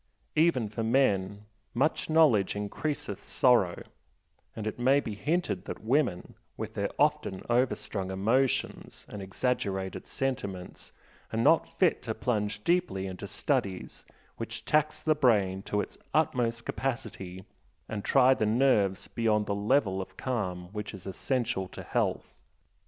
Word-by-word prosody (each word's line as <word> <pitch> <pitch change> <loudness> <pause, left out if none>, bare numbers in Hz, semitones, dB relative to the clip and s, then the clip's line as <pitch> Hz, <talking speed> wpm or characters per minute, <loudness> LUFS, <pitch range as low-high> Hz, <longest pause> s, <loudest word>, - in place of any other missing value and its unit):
Even 155 -8 +3
for 105 +2 -5
men 105 -5 +1 0.3
"much 145 +7 +1
knowledge 150 -13 +4
increaseth 105 +1 -3
sorrow," 115 -9 +2 0.7
and 110 - -5
it 110 +2 -4
may 135 +3 +4
be 110 - -4
hinted 145 - -1
that - - -7
women, 120 -6 +1 0.2
with - - -5
their 100 0 -1
often 150 -10 +1
overstrung 120 -6 0
emotions 115 +8 0
and 105 - -7
exaggerated 95 -2 -2
sentiments, 100 -9 -4 0.4
are - - -2
not - - +4
fit - - +3
to - - -4
plunge 105 -3 -1
deeply 170 - +1
into 95 -1 -6
studies 95 -2 -2 0.3
which 115 0 -6
tax 155 0 +1
the 155 - +4
brain 105 -10 +2
to 105 +1 -1
its - - -8 0.2
utmost 125 -7 +1
capacity 105 -8 -4 0.4
and 105 -2 -4
try 130 -1 +5
the 110 -4 0
nerves 110 -5 +2
beyond 110 -3 +1
the 100 - -1
level 100 -2 +1
of 95 - -5
the - - -26
calm 90 -8 -3
which 105 -1 -5
is 95 - -12
essential 100 -1 -1
to - - -9
health. - - -1
110 Hz, 140 wpm, -29 LUFS, 95-130 Hz, 0.7 s, try